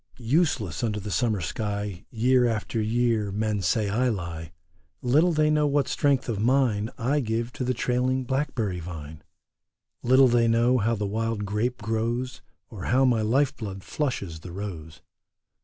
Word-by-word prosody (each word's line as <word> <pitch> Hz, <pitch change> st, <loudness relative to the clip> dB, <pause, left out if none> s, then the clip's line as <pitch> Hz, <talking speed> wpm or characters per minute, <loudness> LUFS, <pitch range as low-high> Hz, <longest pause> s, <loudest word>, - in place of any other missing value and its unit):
Useless 140 Hz, +3 st, 0 dB
under 105 Hz, -2 st, -1 dB
the 105 Hz, +1 st, -6 dB
summer 110 Hz, -2 st, +1 dB
sky 100 Hz, +1 st, -4 dB
Year 125 Hz, +2 st, +3 dB
after 110 Hz, 0 st, -2 dB
year 110 Hz, -2 st, +1 dB
men 105 Hz, 0 st, -1 dB
say 100 Hz, +5 st, +1 dB
I 120 Hz, +6 st, +1 dB
lie. 85 Hz, -6 st, -5 dB, 0.5 s
Little 150 Hz, +8 st, +4 dB
they 155 Hz, -1 st, +2 dB
know 150 Hz, -1 st, +3 dB
what 145 Hz, -1 st, +1 dB
strength 140 Hz, -3 st, +1 dB
of 110 Hz, -5 st, -2 dB
mine 115 Hz, -3 st, +2 dB
I 135 Hz, +5 st, +1 dB
give 115 Hz, -1 st, -2 dB
to -, -, -4 dB
the 125 Hz, 0 st, 0 dB
trailing 125 Hz, +2 st, 0 dB
blackberry 125 Hz, -8 st, -2 dB
vine; 80 Hz, -3 st, -8 dB, 0.8 s
Little 130 Hz, +2 st, +5 dB
they 120 Hz, -1 st, +3 dB
know 120 Hz, +2 st, +3 dB
how 115 Hz, +2 st, +1 dB
the 105 Hz, -1 st, -2 dB
wild 110 Hz, +1 st, -2 dB
grape 110 Hz, +4 st, -2 dB
grows, 115 Hz, +3 st, -2 dB, 0.3 s
Or 100 Hz, -5 st, -7 dB
how 130 Hz, +3 st, +3 dB
my 120 Hz, -3 st, +3 dB
life 130 Hz, +6 st, +2 dB
blood 95 Hz, -3 st, -7 dB
flushes 100 Hz, -, -3 dB
the 90 Hz, +2 st, -10 dB
rose. 85 Hz, -5 st, -7 dB
115 Hz, 160 wpm, -26 LUFS, 105-130 Hz, 0.8 s, Little